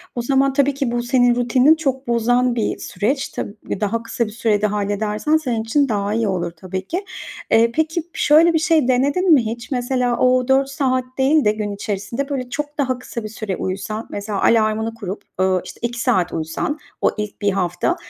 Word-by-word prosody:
O 240 Hz, -, -1 dB
zaman, 270 Hz, +2 st, +2 dB
tabii 280 Hz, 0 st, +2 dB
ki 270 Hz, -3 st, -2 dB
bu 240 Hz, 0 st, -1 dB
senin 245 Hz, -1 st, +3 dB
rutinini 255 Hz, +5 st, +4 dB
çok 270 Hz, -4 st, -2 dB
bozan 245 Hz, +1 st, +2 dB
bir 220 Hz, -, -1 dB
süreç. 255 Hz, +9 st, -2 dB
Tab -, -, -4 dB, 0.3 s
daha 225 Hz, +2 st, -1 dB
kısa 235 Hz, +1 st, -2 dB
bir 215 Hz, -, -7 dB
sürede 215 Hz, -2 st, +1 dB
halledersen 210 Hz, +8 st, 0 dB
senin 245 Hz, -7 st, -2 dB
için 275 Hz, +5 st, +1 dB
daha 205 Hz, -1 st, -1 dB
iyi 225 Hz, 0 st, +1 dB
olur, 175 Hz, -3 st, -1 dB
tabii 185 Hz, +3 st, -6 dB
ki. 375 Hz, +4 st, -3 dB, 0.5 s
Eee, 230 Hz, +1 st, +5 dB
peki, 320 Hz, +4 st, -1 dB
şöyle 320 Hz, +3 st, +5 dB
bir 320 Hz, -, +3 dB
şey 315 Hz, -4 st, +2 dB
denedin 285 Hz, +8 st, +3 dB
mi 255 Hz, -6 st, +4 dB
hiç; 235 Hz, +4 st, -5 dB
mesela, 245 Hz, -1 st, 0 dB
o 255 Hz, 0 st, +3 dB
4 270 Hz, 0 st, +3 dB
saat 260 Hz, -2 st, 0 dB
değil 285 Hz, +3 st, +3 dB
de 210 Hz, -, +5 dB
gün 210 Hz, -1 st, -3 dB
içerisinde 205 Hz, +7 st, -4 dB
böyle 255 Hz, -3 st, -3 dB
çok 295 Hz, +2 st, -4 dB
daha 260 Hz, -3 st, 0 dB
kısa 235 Hz, -2 st, -6 dB
bir 215 Hz, -, -5 dB
süre 215 Hz, -3 st, -4 dB
uyusan, 200 Hz, +4 st, -4 dB
mesela, 205 Hz, 0 st, -4 dB
alarmını 220 Hz, 0 st, +2 dB
kurup, 205 Hz, -3 st, -6 dB, 0.2 s
uuu, 185 Hz, -1 st, +2 dB
işte -, -, -10 dB
2 240 Hz, 0 st, -2 dB
saat 180 Hz, -6 st, +1 dB
uyusan 160 Hz, -, -2 dB, 0.2 s
o -, -, +3 dB
ilk 210 Hz, 0 st, -5 dB
1 205 Hz, 0 st, +2 dB
hafta, 180 Hz, -, 0 dB
235 Hz, 195 wpm, -20 LUFS, 210-270 Hz, 0.5 s, Eee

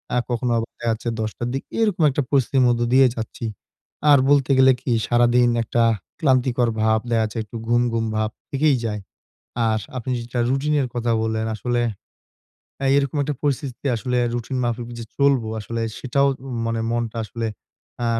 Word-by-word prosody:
আ -, -, +3 dB
কখনো 120 Hz, 0 st, -1 dB
আবার 115 Hz, +1 st, -2 dB
দেখাচ্ছে 115 Hz, 0 st, -1 dB
১০:০০ 110 Hz, +2 st, -3 dB
র -, -, -2 dB
দিক। 135 Hz, -, -2 dB, 0.2 s
এরকম 210 Hz, -7 st, +1 dB
একটা 140 Hz, +2 st, 0 dB
পরিস্থিতির 135 Hz, -1 st, +2 dB
মধ্যে 120 Hz, 0 st, +2 dB
দিয়ে 135 Hz, 0 st, +7 dB
যাচ্ছি। 115 Hz, +1 st, -5 dB, 0.7 s
আর 140 Hz, -, +8 dB
বলতে 140 Hz, -1 st, +4 dB
গেলে 130 Hz, 0 st, +7 dB
কি? -, -, -2 dB, 0.2 s
সারাদিন 120 Hz, 0 st, +4 dB
একটা 115 Hz, +1 st, +1 dB, 0.4 s
ক্লান্তিকর 130 Hz, -5 st, +2 dB
ভাব। 110 Hz, 0 st, +3 dB
দেখা 115 Hz, -1 st, +2 dB
যাচ্ছে 110 Hz, +1 st, -4 dB
একটু 110 Hz, +2 st, -14 dB
ঘুম, 120 Hz, +1 st, +3 dB
ঘুম 115 Hz, 0 st, 0 dB
ভাব 110 Hz, 0 st, 0 dB, 0.2 s
থেকেই 145 Hz, +1 st, +3 dB
যায়। 105 Hz, -2 st, -3 dB, 0.7 s
আর 110 Hz, 0 st, +1 dB, 0.2 s
আপনি 125 Hz, +1 st, -4 dB
যেটা 120 Hz, +1 st, -3 dB
রুটিনের 140 Hz, 0 st, +1 dB
কথা 120 Hz, -1 st, 0 dB
বললেন, 110 Hz, 0 st, -1 dB
আসলে 120 Hz, +2 st, -1 dB, 1.0 s
আ -, -, -2 dB
এইরকম 140 Hz, +1 st, +1 dB
একটা 145 Hz, 0 st, -2 dB
পরিস্থিতিতে 140 Hz, -2 st, -2 dB
আসলে 125 Hz, +2 st, -1 dB, 0.2 s
রুটিন 120 Hz, +2 st, -3 dB
মাফিক 120 Hz, 0 st, -2 dB
যে 115 Hz, -, -5 dB
চলবো, 140 Hz, -5 st, +3 dB
আসলে 115 Hz, +2 st, -4 dB, 0.2 s
সেটাও 140 Hz, +2 st, +1 dB
মা 135 Hz, 0 st, -10 dB
মানে 115 Hz, 0 st, -1 dB
মনটা 120 Hz, -1 st, -2 dB
আসলে 115 Hz, +1 st, -4 dB, 0.6 s
আ -, -, +1 dB
120 Hz, 170 wpm, -22 LUFS, 115-135 Hz, 1.0 s, আর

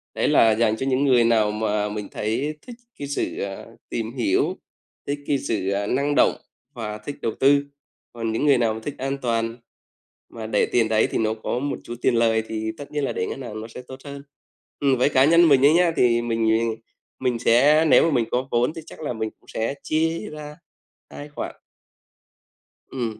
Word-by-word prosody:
đấy -, -, +1 dB
là 115 Hz, -, +5 dB
dành 110 Hz, -1 st, +2 dB
cho 130 Hz, -, -3 dB
những 135 Hz, +1 st, +1 dB
người 125 Hz, -3 st, +5 dB
nào 110 Hz, -2 st, +3 dB
mà 105 Hz, -1 st, -1 dB
mình 105 Hz, -1 st, -5 dB
thấy 135 Hz, +8 st, -2 dB
thích 245 Hz, -, -8 dB, 0.2 s
cái 140 Hz, -, -4 dB
sự, 140 Hz, -, -3 dB
à, 100 Hz, -1 st, -5 dB, 0.2 s
tìm 115 Hz, -1 st, -3 dB
hiểu, 115 Hz, -6 st, +1 dB, 0.5 s
thích 145 Hz, +1 st, -2 dB
cái 140 Hz, -, +2 dB
sự, 105 Hz, -6 st, -2 dB
ờ, 100 Hz, +1 st, -1 dB
năng 140 Hz, +4 st, 0 dB
động -, -, +4 dB, 0.4 s
và 110 Hz, -4 st, -5 dB
thích 105 Hz, +7 st, -7 dB
đầu 115 Hz, -, -1 dB
tư. 140 Hz, +1 st, +4 dB, 0.5 s
Còn 115 Hz, -1 st, -3 dB
những 115 Hz, +6 st, -1 dB
người 140 Hz, -3 st, +5 dB
nào 115 Hz, -2 st, +1 dB
mà 110 Hz, -, -6 dB
thích 145 Hz, -, -5 dB
an 135 Hz, +1 st, -2 dB
toàn 115 Hz, -1 st, -1 dB, 0.7 s
mà 110 Hz, -1 st, -7 dB
để 105 Hz, -2 st, +2 dB
tiền 115 Hz, -2 st, +1 dB
đấy, 110 Hz, 0 st, +3 dB
thì -, -, 0 dB
nó 110 Hz, -1 st, +1 dB
có 110 Hz, +2 st, -3 dB
một 145 Hz, +2 st, -3 dB
chút 120 Hz, -, -7 dB
tiền 125 Hz, -, +2 dB
lời 115 Hz, -1 st, +2 dB
thì 110 Hz, 0 st, -3 dB
tất 145 Hz, -, -10 dB
nhiên 150 Hz, -1 st, -2 dB
là 135 Hz, -, -1 dB
để 90 Hz, -, -2 dB
ngân 135 Hz, -, -6 dB
hàng 110 Hz, -4 st, -6 dB
nó 110 Hz, -, -7 dB
sẽ 120 Hz, +2 st, -10 dB
tốt 130 Hz, 0 st, -9 dB
hơn. 140 Hz, -1 st, -8 dB, 0.6 s
Ừm, 140 Hz, -2 st, +3 dB
với 130 Hz, -, +4 dB
cá 130 Hz, -2 st, +4 dB
nhân 170 Hz, +2 st, +6 dB
mình 140 Hz, -2 st, +5 dB
ấy 145 Hz, -, +6 dB
nhá, 175 Hz, -1 st, +4 dB
thì 120 Hz, -1 st, +3 dB
mình 115 Hz, -1 st, +1 dB, 0.6 s
mình 125 Hz, -2 st, 0 dB
sẽ 140 Hz, +7 st, +4 dB
nếu 160 Hz, -, +6 dB
mà 165 Hz, -, +2 dB
mình 120 Hz, -3 st, +2 dB
có 130 Hz, +2 st, -1 dB
vốn 120 Hz, +4 st, +1 dB
thì 165 Hz, -, -7 dB
chắc -, -, -12 dB
là 150 Hz, -5 st, -3 dB
mình 110 Hz, -1 st, -3 dB
cũng -, -, -28 dB
sẽ 115 Hz, +5 st, -2 dB
chia 165 Hz, +5 st, -1 dB
ra 150 Hz, 0 st, -9 dB, 0.5 s
2 145 Hz, -, -9 dB
khoản. 145 Hz, -, -6 dB, 1.3 s
Ừm, 115 Hz, -4 st, -4 dB
120 Hz, 215 wpm, -23 LUFS, 110-140 Hz, 1.3 s, nhân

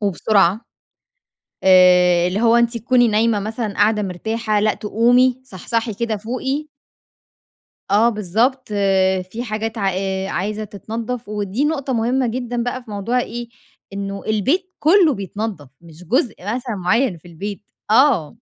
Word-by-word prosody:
وبسرعة. 200 Hz, 0 st, +2 dB, 1.0 s
آآ، 180 Hz, -2 st, +5 dB
اللي 195 Hz, +5 st, -2 dB
هو 235 Hz, 0 st, +4 dB
أنتِ 235 Hz, 0 st, +2 dB
تكوني 245 Hz, +1 st, +3 dB
نايمة 215 Hz, 0 st, +2 dB
مثلًا، 215 Hz, 0 st, -4 dB
قاعدة 210 Hz, +1 st, +2 dB
مرتاحة، 215 Hz, +3 st, -2 dB
لأ، 215 Hz, +1 st, +2 dB
تقومي 245 Hz, +4 st, +2 dB
صحصحي 230 Hz, 0 st, -3 dB
كده 220 Hz, 0 st, -2 dB
فوقي. 265 Hz, +7 st, -3 dB, 1.2 s
آه 220 Hz, +4 st, +5 dB
بالضبط، 230 Hz, +5 st, 0 dB, 0.6 s
في 235 Hz, +2 st, -4 dB
حاجات 220 Hz, -1 st, -4 dB
عا 200 Hz, -2 st, +1 dB
آآ، 190 Hz, 0 st, -2 dB
عايزة 210 Hz, +5 st, -3 dB
تتنَضّف 225 Hz, +3 st, -6 dB
ودي 210 Hz, +5 st, -2 dB
نقطة 280 Hz, -4 st, -2 dB
مهمة 245 Hz, +2 st, +1 dB
جدًا 240 Hz, 0 st, -3 dB
بقى 245 Hz, +1 st, -4 dB
في 220 Hz, -, -12 dB
موضوع 230 Hz, +5 st, -1 dB
إيه، 240 Hz, -1 st, -5 dB, 0.4 s
إنه 200 Hz, 0 st, -5 dB
البيت 280 Hz, -, 0 dB
كُلُّه 330 Hz, -1 st, +4 dB
بيتنضّف، 200 Hz, -, -5 dB
مش 165 Hz, 0 st, -15 dB
جزء 230 Hz, +4 st, 0 dB
مثلًا 235 Hz, +4 st, -4 dB
مُعيّن 200 Hz, +3 st, +1 dB
في 165 Hz, -, -17 dB
البيت، 200 Hz, +4 st, -8 dB, 0.2 s
آه. 230 Hz, -, +3 dB
220 Hz, 135 wpm, -20 LUFS, 200-245 Hz, 1.2 s, آآ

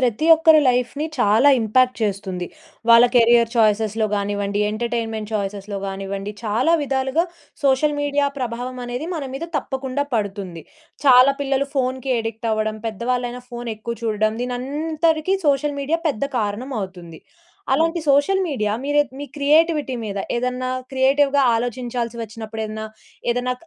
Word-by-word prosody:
ప్రతి 250 Hz, +4 st, +1 dB
ఒక్కరి 320 Hz, -1 st, +6 dB
లైఫ్‌ని 250 Hz, +4 st, 0 dB
చాలా 225 Hz, +4 st, +4 dB
ఇంపాక్ట్ 255 Hz, +3 st, +2 dB
చేస్తుంది. 190 Hz, -3 st, -2 dB, 0.4 s
వాళ్ళ 230 Hz, +1 st, +8 dB
కెరియర్ 235 Hz, -1 st, +5 dB
ఛాయిసెస్‌లలో 220 Hz, -1 st, +2 dB
గానివ్వండి, 205 Hz, 0 st, -1 dB
ఎంటర్‌టైన్‌మెంట్ 225 Hz, -1 st, -3 dB
ఛాయిసెస్‌లలో 200 Hz, -1 st, -3 dB
గానివ్వండి, 195 Hz, +1 st, -5 dB
చాలా 225 Hz, +10 st, +2 dB
విధాలుగా 270 Hz, +3 st, 0 dB, 0.4 s
సోషల్ 280 Hz, +2 st, +3 dB
మీడియా 285 Hz, 0 st, +1 dB
ప్రభావమనేది 250 Hz, +3 st, -4 dB
మన 300 Hz, -, -4 dB
మీద 275 Hz, -, -4 dB
తప్పకుండా 265 Hz, 0 st, -2 dB
పడుతుంది. 195 Hz, -6 st, -3 dB, 0.4 s
చాలా 255 Hz, +1 st, +7 dB
పిల్లలు 275 Hz, 0 st, 0 dB
ఫోనుకి 260 Hz, 0 st, -1 dB
అడిక్ట్ 225 Hz, 0 st, -4 dB
అవ్వడం, 215 Hz, 0 st, -1 dB
పెద్దవాళ్ళైనా 245 Hz, +3 st, -2 dB
ఫోనెక్కువ 235 Hz, -1 st, -5 dB
చూడడం, 215 Hz, 0 st, +1 dB
దీనంతరికీ 310 Hz, +7 st, 0 dB
సోషల్ 285 Hz, +1 st, +1 dB
మీడియా 320 Hz, +4 st, 0 dB
పెద్ద 280 Hz, -3 st, -1 dB
కారణమవుతుంది. 205 Hz, -, -4 dB, 0.5 s
అలాంటి 330 Hz, +4 st, +2 dB
సోషల్ 285 Hz, +8 st, +3 dB
మీడియా 215 Hz, -10 st, -1 dB
మీరే 290 Hz, +1 st, +2 dB, 0.2 s
మీ 290 Hz, -, -5 dB
క్రియేటివిటీ 300 Hz, -1 st, +2 dB
మీద, 200 Hz, -2 st, -4 dB, 0.2 s
ఏదన్నా 250 Hz, +1 st, -2 dB, 0.2 s
క్రియేటివ్‌గా 275 Hz, +1 st, +3 dB
ఆలోచించాల్సి 240 Hz, 0 st, -3 dB
వచ్చినప్పుడు 220 Hz, 0 st, -6 dB
ఏదన్నా 215 Hz, 0 st, -5 dB, 0.5 s
ఏదన్నా 245 Hz, +1 st, -1 dB
245 Hz, 120 wpm, -21 LUFS, 215-275 Hz, 0.5 s, వాళ్ళ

